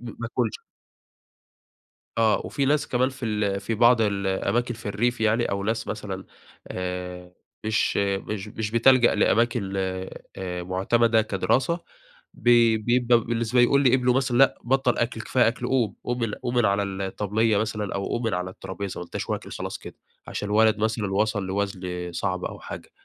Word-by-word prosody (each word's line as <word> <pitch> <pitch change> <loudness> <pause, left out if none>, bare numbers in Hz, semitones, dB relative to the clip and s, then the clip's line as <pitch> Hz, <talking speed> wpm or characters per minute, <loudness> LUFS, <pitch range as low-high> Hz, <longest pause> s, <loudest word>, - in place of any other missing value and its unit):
م 120 - -7
ما 115 - -4
اكُلش. 115 -2 -2 1.6
آه، 110 -1 +3
وفي 140 - -1
ناس 150 +2 +2
كمان 130 +1 +1
في 130 -2 -7
ال 105 -3 0
في 110 +3 -3
بعض 120 +1 +5
الأماكن 100 +4 0
في 115 - -13
الريف 110 +3 0
يعني 110 +2 +2
أو 100 0 -2
ناس 110 +2 -2
مثلًا، 100 -3 -5 0.4
آآ 90 -1 -5 0.3
مش 110 0 +1
مش 100 +1 -2
مش 105 0 -4
بتلجأ 120 +1 +5
لأماكن 110 -2 +2 0.6
آآ 90 -2 -4
معتمَدة 110 +5 +2
كدراسة، 115 - 0 0.5
بي 120 -2 +4
بيبقى 120 +2 +3
بالنسبة 115 +1 0
يقول 140 +3 +4
لابنه 125 -1 +4
مثلًا: 130 -2 +1
"لأ، 135 - +4
بطَّل 130 0 +1
أكل، 115 -1 -1
كفاية 120 +1 +2
أكل، 120 +1 -2
قوم، 120 -7 +1
قوم 125 0 -2
من 115 -3 -1
قوم 120 0 -4
من 120 -2 +4
على 100 +1 +2
الطبلية 100 +3 0
مثلًا 105 -2 -2
أو 100 - -2
قوم 120 - -2
من 115 - 0
على 90 +1 -2
الطرابيزة 95 +1 -6
ما 90 - -6
أنتاش - - -6
واكل - - -4
خلاص - - -5
كده." - - -11 0.3
عشان 105 - -4
الولد 110 0 +4
مثلًا 110 -2 -1
وصل 105 0 0
لوزن 95 -2 -3
صعب 90 +1 -2
أو - - -6
حاجة. - - -9
110 Hz, 165 wpm, -25 LUFS, 100-120 Hz, 1.6 s, بعض